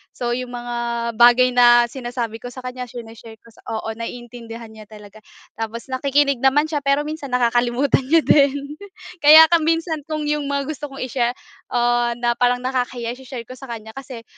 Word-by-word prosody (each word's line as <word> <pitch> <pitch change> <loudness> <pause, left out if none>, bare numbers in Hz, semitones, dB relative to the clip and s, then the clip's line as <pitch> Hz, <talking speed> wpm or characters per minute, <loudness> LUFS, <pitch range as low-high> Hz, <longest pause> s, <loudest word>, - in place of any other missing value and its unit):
so 240 -1 -3
yung 245 0 -4
mga 235 -1 -3
bagay 245 +1 +6
na 240 -1 +5
sinasabi 240 -3 -5
ko 245 - -8
sa 250 +1 -10
kanya 250 0 -6
shine-share 225 -1 -11
ko 230 - -18 0.2
oo 220 0 -4
naiintindihan 230 -1 -8
niya 215 -1 -13
talaga. 210 -1 -14 0.4
Tapos 230 +3 -6
nakikinig 280 0 +1
naman 290 +4 +2
siya 295 - 0
pero 280 +1 +1
minsan 305 -1 -6
nakakalimutan 250 +2 +1
niya 325 +1 +4
din. 280 +1 +2 0.4
Kaya 310 +1 +9
ka 340 - +5
minsan 320 -1 -1
kung 310 -1 -3
iyong 295 -1 -1
mga 280 0 -1
gusto 295 0 -6
kong 275 -1 -7
i-share, 245 -1 -1 0.3
ah, 240 0 +1
na 240 0 0
parang 245 0 +2
nakakahiya 250 -2 -2
i-share 255 -1 -8
ko 255 +3 -12
sa 270 - -10
kanya 220 -2 -8
kasi 255 -2 -9
245 Hz, 175 wpm, -20 LUFS, 235-280 Hz, 0.4 s, Kaya